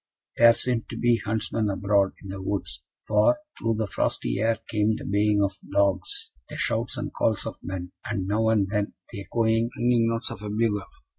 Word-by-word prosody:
There 115 0 +8
seemed 120 -3 -1
to - - -6
be 120 -2 +3
huntsmen 110 0 -1
abroad 100 0 +2
in 100 - -8
the 95 0 -5
woods; 90 -9 -3 0.3
for 105 - +4 0.2
through 115 -1 0
the 110 0 0
frosty - - -1
air 115 +1 +2
came 110 -1 +1
the - - -7
baying 105 0 +2
of 100 -1 0 0.2
dogs, 100 -2 0 0.2
the - - -7
shouts - - -1
and - - -4
calls - - +1
of - - -6
men, 90 -1 -5 0.2
and, 100 -4 -1
now 110 +3 +1
and 105 -3 +3
then, 105 +1 -1 0.2
the 100 - -6
echoing, 115 +2 +1
ringing 120 -1 +3
notes 115 0 -1
of 100 - -8
a 105 - -5
bugle. 105 -2 0
105 Hz, 195 wpm, -26 LUFS, 100-115 Hz, 0.3 s, There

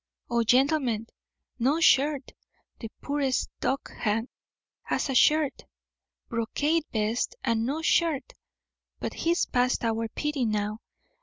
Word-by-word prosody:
Oh, 235 0 +3
gentlemen, 255 -2 +2 0.5
no 275 +7 +2
shirt! 285 -3 +3 0.5
The 225 - -6
poorest 280 -2 0
dockhand 225 -3 -1 0.6
has 275 - -1
a - - -1
shirt! 300 +2 +3 0.6
Brocaded 290 +8 0
vest 220 - -1
and 230 -1 +1
no 305 +4 -2
shirt; 315 -6 +1 0.7
but - - -4
he's 340 +1 +1
past 250 -1 +1
our 225 0 0
pity 295 +3 -2
now. 215 -1 -1
260 Hz, 110 wpm, -27 LUFS, 230-295 Hz, 0.7 s, Oh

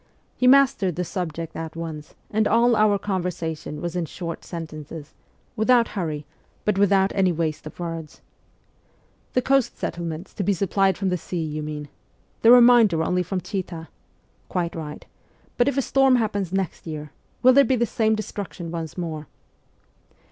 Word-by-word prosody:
He 250 - +2
mastered 265 - +4
the 180 - -1
subject 165 -2 -4
at 165 0 -6
once, 160 -2 -7 0.2
and 215 0 +2
all 235 +1 +4
our 210 -1 +4
conversation 175 -6 -3
was 175 0 -4
in 175 -2 -1
short 170 0 -6
sentences, 155 -2 -8 0.4
without 235 +2 +4
hurry, 155 -7 -3 0.4
but 210 - +2
without 195 -1 +4
any 190 -2 +3
waste 155 -2 -2
of 155 - -11
words. 165 -2 -6 0.6
' - - -38
The 255 - +2
coast 270 -2 +2
settlements 170 +1 -5
to 200 - -3
be 200 - +2
supplied 195 0 +1
from 195 -2 0
the 180 - 0
sea, 170 0 -4
you 155 -1 -4
mean? 150 -1 -5 0.5
The 225 - +6
remainder 235 -8 +7
only 180 +2 +1
from 185 +1 -3
Chita? 175 -5 -5 0.6
Quite 175 -2 -1
right. 150 -2 -7 0.5
But 245 - +2
if 280 -1 0
a 275 - +2
storm 270 0 +4
happens 205 -6 -1
next 190 -3 -3
year, 150 -2 -6 0.3
will 255 +1 +8
there 280 +2 +7
be 265 - +2
the 235 -1 +2
same 220 0 +1
destruction 200 -5 -6
once 165 -1 -5
more 160 -4 -4
180 Hz, 165 wpm, -24 LUFS, 160-215 Hz, 0.6 s, will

